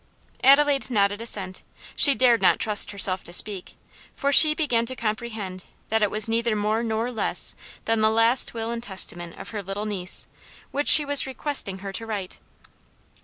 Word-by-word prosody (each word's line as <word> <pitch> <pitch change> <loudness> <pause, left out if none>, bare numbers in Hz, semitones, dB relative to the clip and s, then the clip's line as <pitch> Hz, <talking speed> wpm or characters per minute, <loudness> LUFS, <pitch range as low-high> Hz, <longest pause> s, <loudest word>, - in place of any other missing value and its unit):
Adelaide 280 0 +3
nodded 205 -2 -1
assent; 195 -5 +3 0.3
she 280 -2 +6
dared 240 0 +2
not - - +2
trust 210 -2 +2
herself 190 -2 +3
to - - -7
speak, 190 +1 -1 0.4
for 280 0 -2
she 305 +1 +7
began 260 -8 -1
to 255 +3 -6
comprehend 215 -5 -6 0.2
that 220 0 -1
it 210 - +1
was 215 +1 +2
neither 230 0 -2
more 215 +2 -2
nor 230 +1 -4
less 225 - 0 0.3
than 225 -1 -1
the 215 - +2
last 230 +3 +1
will 225 0 -5
and 235 0 -6
testament 175 -5 -3
of - - -11
her 210 -2 -7
little 195 +2 -7
niece, 195 -4 -3 0.5
which 285 +1 -4
she 300 - +7
was 285 -1 +3
requesting 265 -7 -3
her 195 - -6
to 225 +4 -7
write. 200 -4 -7
220 Hz, 175 wpm, -22 LUFS, 200-240 Hz, 0.5 s, she